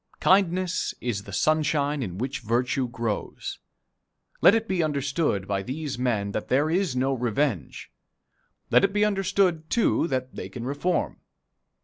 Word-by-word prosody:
Kindness 185 -1 +2
is 110 -4 -3
the 100 - -9
sunshine 150 +4 +1
in 95 -7 -4
which 130 +5 -3
virtue 125 +3 0
grows. 115 -3 -4 0.8
Let 200 - +7
it 225 0 -1
be 185 -4 0
understood 140 - 0
by 100 -1 -1
these 135 +4 -5
men 110 -5 0
that 110 - -4
there 145 +5 +2
is 180 -6 +1
no 130 +2 +1
revenge; 120 - -2 0.8
let - - +6
it 195 0 +2
be 210 0 +3
understood, 195 -5 +1
too, 230 -7 +2
that 130 -2 -2
they - - -6
can 120 - -7
reform. 145 +6 -1
140 Hz, 145 wpm, -26 LUFS, 120-170 Hz, 0.8 s, Let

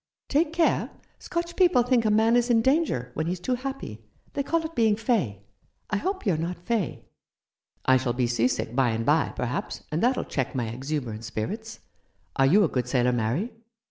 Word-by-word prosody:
"Take 300 +2 +2
care. 335 0 +2 0.3
Scotch 340 0 -4
people 350 -9 +4
think 245 -2 +2
a - - +4
man 220 +2 +4
is 245 0 +2
in 225 -2 +4
danger 265 - +1
when 160 +4 -2
he's 180 +1 -2
too 250 +8 -1
happy. 255 - -5 0.3
They 280 - -1
call 325 +3 0
it 320 - -6
being 220 -5 +3
fey. 200 - -1 0.5
I 210 - +2
hope 380 - -3
you're 185 -6 +2
not 170 +3 -3
fey." 195 0 -2 0.8
"I 130 0 +6
shall 130 -2 -1
be 125 0 +1
sea 120 0 +2
sick 120 -2 -3
by 130 -2 +3
and 115 0 -2
by, 155 +2 +3
perhaps, 125 0 -3
and 155 - -1
that'll 250 +2 +2
check 135 0 -3
my 120 -3 -1
exuberant 125 -2 -4
spirits. 200 - -5 0.5
Are 135 - +4
you 200 +9 +5
a - - +4
good 125 -4 -2
sailor, 125 -1 +2
Mary?" 120 - -1
180 Hz, 195 wpm, -26 LUFS, -, 0.8 s, I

